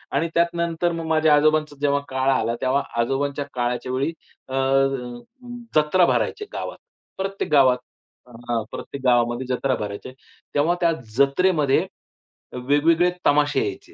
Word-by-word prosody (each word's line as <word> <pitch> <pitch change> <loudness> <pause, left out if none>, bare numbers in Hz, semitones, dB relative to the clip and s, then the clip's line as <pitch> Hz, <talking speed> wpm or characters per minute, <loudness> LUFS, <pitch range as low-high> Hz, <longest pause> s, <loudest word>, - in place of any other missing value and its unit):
आणि 165 +4 +1
त्यात 170 0 +2
नंतर 170 0 0
मग 165 -1 -4
माझ्या 155 -1 +4
आजोबांचा 155 0 +2
जेव्हा 140 -1 +2
काळ 130 0 0
आला 115 -2 0
तेव्हा 135 +2 +1 0.2
आजोबांच्या 140 +3 -1
काळाच्या 125 0 -2
वेळी 135 +4 0 0.4
अ, 130 - -9 1.2
जत्रा 155 +4 +4
भरायचे 420 - 0
गावात. - - -5 0.4
प्रत्येक 195 -4 -3
गावात 130 -3 +5 0.5
अ, 120 -1 -4
प्रत्येक 140 -1 -8
गावामध्ये 120 0 +2
जत्रा 130 0 0
भरायचे. 105 +2 -6 0.4
तेव्हा 155 +4 +2
त्या 170 - +4 0.3
जत्रेमध्ये 140 0 +3 0.8
वेगवेगळे 165 +5 +3
तमाशे 145 - +3
यायचे. 390 -2 -8
145 Hz, 130 wpm, -23 LUFS, 130-165 Hz, 1.2 s, गावात